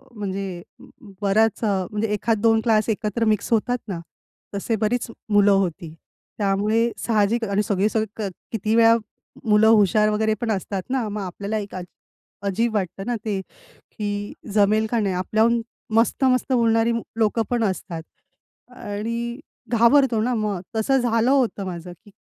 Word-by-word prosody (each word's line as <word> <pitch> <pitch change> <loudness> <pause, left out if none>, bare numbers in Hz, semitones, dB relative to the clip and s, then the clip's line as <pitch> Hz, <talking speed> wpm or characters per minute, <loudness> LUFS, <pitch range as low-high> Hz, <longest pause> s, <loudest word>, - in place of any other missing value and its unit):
म्हणजे 195 -3 -4 0.6
बराच 215 +3 +2
अ, - - +2 0.2
म्हणजे 210 +1 -1
एखाद 220 +1 0
2 225 0 +4
क्लास 220 -1 +2
एकत्र 215 +1 -1
मिक्स 215 0 0
होतात 245 +3 +1
ना, 180 -4 -4 0.6
तसे 225 +3 -1
बरीच 245 +3 0 0.2
मुलं 205 -1 +5
होती. 180 -4 0 0.4
त्यामुळे 210 +3 +1 0.2
साहजिकच 220 0 +1
आणि 200 +1 +1
सगळे-सगळे 215 0 -1 0.2
किती 220 0 0
वेळा 230 0 +6 0.5
मुलं 215 -1 +4
हुशार 215 -1 +4
वगैरेपण 220 +1 0
असतात 195 -1 -2
ना. 255 -4 0
मग 205 0 -4
आपल्याला 200 +3 -4
एक 200 -2 -7
अज 180 -1 -5 0.6
अजीब 225 +4 0
वाटतं 195 -1 -2
ना 240 -1 -1
ते 205 -3 -1 0.5
की 205 -1 -4 0.2
जमेल 215 +1 +3
का 235 - +2
नाही? 195 -3 0
आपल्याहून 220 +5 +2 0.3
मस्त-मस्त 255 +3 +2
बोलणारी 230 -1 +3
मु 230 0 -1 0.2
लोकं 225 +1 +2
पण 240 -2 +1
असतात 180 -4 -3 0.8
आणि 230 +3 -4 0.4
घाबरतो 235 0 +5
ना 245 +2 0
मग? 210 -4 -1 0.2
तसं 265 +5 +2
झालं 235 +1 +2
होतं 245 -7 +1
माझं, 175 -1 -6
की 205 - -16
215 Hz, 145 wpm, -23 LUFS, 200-230 Hz, 0.8 s, वेळा